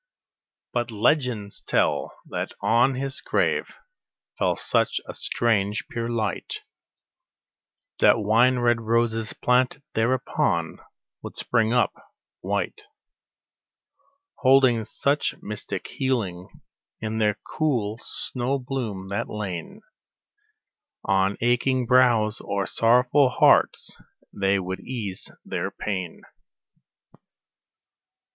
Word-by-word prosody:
But 120 -1 -1
legends 115 -2 0
tell - - 0
that - - -4
on 120 +3 +3
his 135 +1 -3
grave - - 0 0.6
fell - - +2
such - - +1
a - - -6
strange, 105 -3 0
pure 115 0 -3
light, 115 -2 -3 1.4
That - - +6
wine 115 +4 +3
red 120 -1 +2
roses 115 -1 0
planted 125 +3 +1
thereupon 110 -8 0 0.4
would - - -9
spring 115 -2 +1
up 120 0 +2 0.5
white, 425 - -2 1.6
Holding 130 -4 +4
such 140 +6 0
mystic 105 +1 -6
healing 110 -10 -2 0.5
in 110 0 -3
their 105 -1 +2
cool 120 -8 -1
snow 130 +2 -2
bloom, 120 -8 -4
that 100 - -2
lain 95 -6 -6 1.2
On 95 0 +2
aching 125 +2 +2
brows 120 -4 +3
or 100 -1 -1
sorrowful 125 +6 +3
hearts, - - +3 0.3
they 100 0 +1
would 95 0 -4
ease 105 -7 -5 0.2
their - - -3
pain. 95 -5 -5
115 Hz, 95 wpm, -25 LUFS, 105-125 Hz, 1.6 s, That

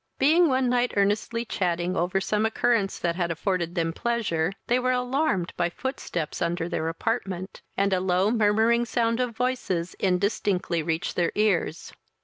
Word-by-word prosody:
Being 330 +5 +5
one 260 -2 +2
night 245 0 +1
earnestly 210 +4 +1
chatting 175 -3 -1
over 180 +2 +1
some 210 +2 0
occurrence 220 -2 +1
that 170 -1 -1
had 175 -1 -1
afforded 175 +1 -1
them 165 -2 0
pleasure, 200 -8 0
they 245 +1 +2
were 255 0 +1
alarmed 250 - 0
by 175 - 0
footsteps 175 - -4
under 170 0 -1
their 165 -2 -2
apartment, 190 0 -3 0.2
and 200 0 +2
a 185 - +2
low 185 +2 +2
murmuring 225 +1 +3
sound 230 0 0
of 245 -3 -2
voices 245 -9 -1
indistinctly 185 -2 0
reached 165 +2 -2
their 175 -2 +1
ears. 200 -6 0
200 Hz, 155 wpm, -26 LUFS, 175-235 Hz, 0.2 s, Being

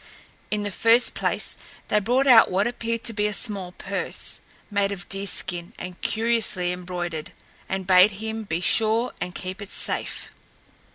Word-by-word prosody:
In 210 -1 -1
the 205 - -3
first 230 +5 +4
place, - - -1 0.3
they 210 - +3
brought 245 +6 +1
out 245 -4 +7
what 190 +2 +1
appeared 230 -1 -3
to 230 - -1
be 210 0 +1
a 210 - -3
small 195 -5 0
purse, 195 +2 -1 0.3
made 200 -1 +1
of 190 -3 -6
deer 195 +1 -1
skin 175 -2 -1
and 180 0 -8
curiously 220 -6 +1
embroidered, 175 -3 -5 0.4
and 190 -1 -3
bade 185 +2 +6
him 220 +2 -5
be 170 -4 -3
sure 225 +6 +2
and 180 - -4
keep 185 +2 -6
it 200 - -8
safe. - - -2
200 Hz, 165 wpm, -24 LUFS, 180-225 Hz, 0.4 s, out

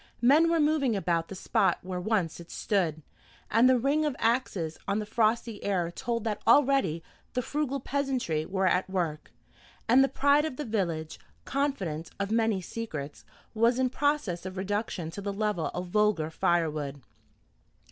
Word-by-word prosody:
Men 300 +7 +6
were 335 -1 +2
moving 295 -6 +2
about 170 -4 0
the 195 - -8
spot 185 -1 +1
where 180 -1 -4
once 190 -6 0
it 170 - -11
stood, 165 -7 -1 0.5
and 230 +4 +5
the 260 - +5
ring 280 +5 +1
of 295 -4 -1
axes 215 -9 0
on 200 0 +1
the 215 - -2
frosty 225 0 0
air 180 -4 0
told 230 +4 -3
that 220 -2 -2
already 270 - +4 0.3
the 250 - 0
frugal 285 -1 -2
peasantry 260 - -1
were 190 +3 -1
at 185 0 +2
work; 165 -5 -3 0.6
and 255 +4 +6
the - - +3
pride 285 +1 +3
of 315 -4 -3
the 295 - -5
village, 170 -8 -2 0.3
confidant 195 - -2
of 200 +1 -2
many 225 -3 +2
secrets, 160 -8 -6 0.3
was 230 +2 +3
in 255 -1 +1
process 285 - 0
of 185 0 -7
reduction 190 -4 -2
to 200 - -7
the 200 0 -3
level 205 -4 -1
of 180 0 -5
vulgar 210 -6 +1
fire 170 -1 +1
wood. 145 -3 -5
210 Hz, 165 wpm, -28 LUFS, 175-255 Hz, 0.6 s, Men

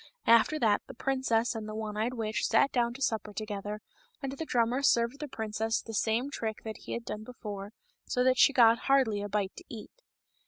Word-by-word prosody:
After 230 +7 +5
that 220 -7 +2
the 265 - -10
princess 260 -3 0
and 220 -2 -6
the 215 - -6
one 215 -1 -4
eyed 225 +4 -1
witch 220 -2 -2
sat 230 +5 +3
down 235 -1 0
to 270 - -4
supper 220 -4 -1
together, 210 0 -5 0.4
and 275 -2 -4
the 275 +4 -5
drummer 240 +2 +1
served 235 0 +2
the 300 - -4
princess 220 -2 -2
the 225 - -9
same 230 +6 0
trick 220 -5 -4
that 220 -1 -6
he - - -7
had 235 - -4
done 215 - -5
before, 210 -4 -7 0.4
so 250 - +1
that 255 0 +3
she - - +7
got 235 -3 +5
hardly 250 -7 +3
a 205 - -4
bite 205 -2 -1
to 360 - -9
eat. 225 -6 -9
225 Hz, 210 wpm, -30 LUFS, 215-255 Hz, 0.4 s, she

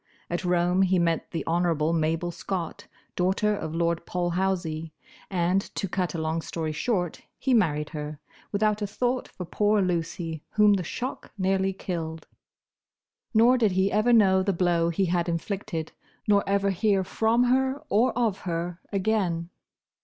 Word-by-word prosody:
At 175 +2 -1
Rome 180 +1 +2
he 190 -1 +3
met 170 -1 0
the 165 - -4
Honourable 165 -2 +1
Mabel 165 +2 0
Scott, 175 0 -5 0.3
daughter 195 +4 +1
of 160 -4 -5
Lord 170 0 0
Polhousie, 175 -3 -1 0.3
and, 180 +1 +2
to 195 - -2
cut 180 -1 -2
a - - -1
long 160 +1 -1
story 160 -1 -3
short, 175 +1 -1 0.2
he 265 - 0
married 150 -9 +2
her, 150 -1 -6 0.3
without 210 +1 +1
a 205 - 0
thought 245 +5 -1
for 180 - -8
poor 210 +4 +2
Lucy, 170 -3 -2
whom 210 -1 +5
the 190 -2 0
shock 250 +10 -5
nearly 190 0 +1
killed. 165 -4 -5 1.1
Nor 240 +3 +6
did 215 -5 +3
he 190 +2 +2
ever 215 +4 +3
know 195 -5 +5
the 195 +1 +1
blow 170 -1 +2
he 190 +3 +1
had 175 0 0
inflicted, 170 -1 -3 0.4
nor 205 -1 +4
ever 200 0 +2
hear 195 0 +2
from 225 +5 +2
her, 265 +2 +1
or 240 +5 +3
of 220 -5 +1
her, 175 -1 -4
again. 185 -4 0
185 Hz, 155 wpm, -26 LUFS, 170-205 Hz, 1.1 s, Nor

